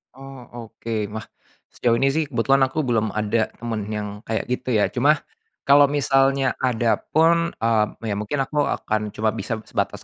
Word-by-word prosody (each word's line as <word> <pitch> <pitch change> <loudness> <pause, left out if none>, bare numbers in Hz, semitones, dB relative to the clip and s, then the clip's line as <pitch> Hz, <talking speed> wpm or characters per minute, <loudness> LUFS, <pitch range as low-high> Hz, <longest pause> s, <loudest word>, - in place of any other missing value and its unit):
Oh 135 -1 -11 0.2
oke, 110 -1 -4
wah 110 - -4 0.5
sejauh 120 -2 +1
ini 135 +3 +2
sih 155 +3 +1
kebetulan 135 +2 +2
aku 155 +4 -2
belum 110 -5 0
ada 110 +1 +1
temen 110 -3 -4
yang 105 -1 -3 0.2
kayak 110 0 -1
gitu 125 -1 -1
ya, 105 - +2
cuma 145 +5 +2 0.4
kalau 140 0 +6
misalnya 135 -1 +2
ada 120 -2 +1 0.2
pun, 170 +1 +3
eee, 115 -1 +2 0.3
ya - - -1
mungkin 135 +7 -1
aku 145 +2 0
akan 110 0 -2
cuma 110 0 +1
bisa 110 +1 -4
sebatas - - -3
120 Hz, 165 wpm, -22 LUFS, 110-135 Hz, 0.5 s, kalau